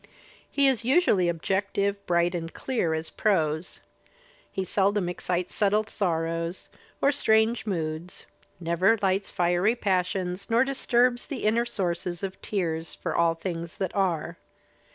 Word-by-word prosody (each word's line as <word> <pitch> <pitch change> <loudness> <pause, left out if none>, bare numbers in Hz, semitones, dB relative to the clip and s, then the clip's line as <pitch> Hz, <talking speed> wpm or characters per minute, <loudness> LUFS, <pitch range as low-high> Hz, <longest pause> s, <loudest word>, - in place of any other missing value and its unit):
He 280 -1 +3
is 255 -4 +2
usually 245 - +3
objective, 200 +3 -1
bright 175 0 +2
and 165 -1 -4
clear 200 -12 -1
as 160 0 -4
prose. 160 -5 0 0.7
He 190 - -2
seldom 200 0 +1
excites 180 0 -2
subtle 210 +1 +2
sorrows 165 -3 -2 0.3
or 280 - +5
strange 220 -4 +2
moods, 165 -2 -3 0.3
never 180 +6 +2
lights 195 +1 +1
fiery 180 +5 +2
passions 185 -2 -1
nor 235 +2 +4
disturbs 250 -2 +1
the 280 -6 -5
inner 230 +3 +2
sources 175 -3 -2
of 190 -1 -5
tears 165 -5 -2
for - - -4
all 170 -1 +3
things 170 -1 -5
that 190 -3 -3
are. 185 -6 -1
185 Hz, 130 wpm, -27 LUFS, 170-215 Hz, 0.7 s, or